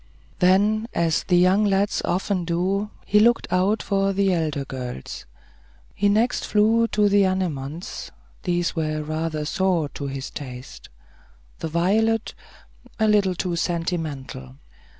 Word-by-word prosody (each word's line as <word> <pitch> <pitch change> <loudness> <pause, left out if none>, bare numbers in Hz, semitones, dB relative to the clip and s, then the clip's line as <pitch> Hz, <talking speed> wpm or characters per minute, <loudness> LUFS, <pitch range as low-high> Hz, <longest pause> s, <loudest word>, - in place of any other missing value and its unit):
Then, 205 +4 +3
as 165 -2 +1
the 180 - +3
young 185 +4 +4
lads 200 0 +1
often 185 0 -1
do, 185 +5 -1 0.2
he 210 - +4
looked 235 +2 +4
out 195 +4 +2
for 195 -1 +1
the 195 -1 +2
elder 155 -5 -1
girls. 125 - -7 0.7
He 205 - +1
next 225 +5 +1
flew 225 +2 +3
to 210 -2 +2
the 200 0 +4
anemones; 170 -4 -3 0.3
these 175 -1 -1
were 155 -2 -2
rather 155 0 -3
sour 180 -3 0
to 140 - -6
his 135 -1 -5
taste. 125 -3 -9 0.7
The - - -3
violet, 210 +7 +1 0.6
a 220 - +2
little 200 -3 +3
too 175 0 -2
sentimental. 160 - -3
180 Hz, 130 wpm, -23 LUFS, 155-205 Hz, 0.7 s, young